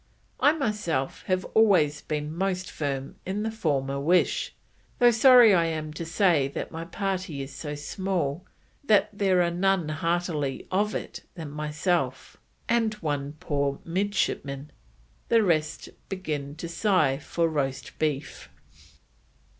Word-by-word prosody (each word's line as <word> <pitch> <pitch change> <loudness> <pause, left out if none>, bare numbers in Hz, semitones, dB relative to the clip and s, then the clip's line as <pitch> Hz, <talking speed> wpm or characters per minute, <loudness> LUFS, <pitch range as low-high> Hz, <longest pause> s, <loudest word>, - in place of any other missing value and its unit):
I 290 - +5
myself 210 - -2
have 185 0 0
always 180 -10 +4
been 150 +1 -4
most 190 0 -2
firm 140 -2 -4
in 200 +3 -3
the 225 - -2
former 140 -9 -1
wish, 170 +6 +1 0.4
though 240 -1 +6
sorry 240 -1 +7
I 170 -2 +4
am 155 -2 -3
to 165 +2 -5
say 165 -5 +3
that 140 - -5
my 165 0 -6
party 185 -6 -3
is 135 0 -9
so 150 +2 -5
small 170 0 -2 0.4
that 215 -7 +3
there 190 -3 +3
are 170 - 0
none 180 -2 +1
heartily 160 -3 -1
of 205 +3 +1
it - - -6
than 160 -5 -7
myself, 150 -2 -2 0.3
and 230 -2 +1
one 145 -6 -3
poor 140 -4 -1
midshipman, 165 -6 -2 0.6
the 230 -1 +5
rest 155 -5 0 0.2
begin 150 -7 -4
to 165 +2 -6
sigh 170 -7 +2
for 165 +2 0
roast 140 -4 -3
beef." 150 - -2
165 Hz, 135 wpm, -26 LUFS, 145-195 Hz, 0.6 s, sorry